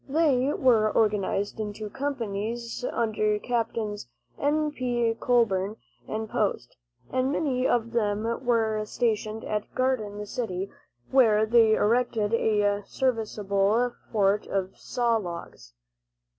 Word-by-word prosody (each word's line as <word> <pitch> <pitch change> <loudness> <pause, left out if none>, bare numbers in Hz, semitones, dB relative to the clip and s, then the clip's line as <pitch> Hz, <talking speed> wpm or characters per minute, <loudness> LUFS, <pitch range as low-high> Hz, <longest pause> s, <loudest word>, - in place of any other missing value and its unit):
They 280 -3 +2
were 230 -6 +3
organized 205 -1 0
into 215 0 -4
companies 235 -2 -4
under 215 -2 +1
Captains 225 - -2 0.3
N. 300 +1 +1
P. 240 -4 0
Colburn 215 -5 +2 0.3
and 220 0 -3
Post, - - -2 0.4
and 260 +1 +1
many 265 -4 0
of 230 -1 +1
them 210 -2 0 0.2
were 220 -3 +1
stationed 220 -1 -1
at 210 -1 -4
Garden 215 -6 -1
City, 200 -4 -4 0.4
where 220 -5 +5
they 220 -1 +5
erected 225 -1 +1
a 205 -2 +2
serviceable 220 -1 0 0.2
fort 205 -1 +2
of 190 -1 -2
saw 235 -2 0
logs. 170 - -8
220 Hz, 110 wpm, -27 LUFS, 210-245 Hz, 0.4 s, where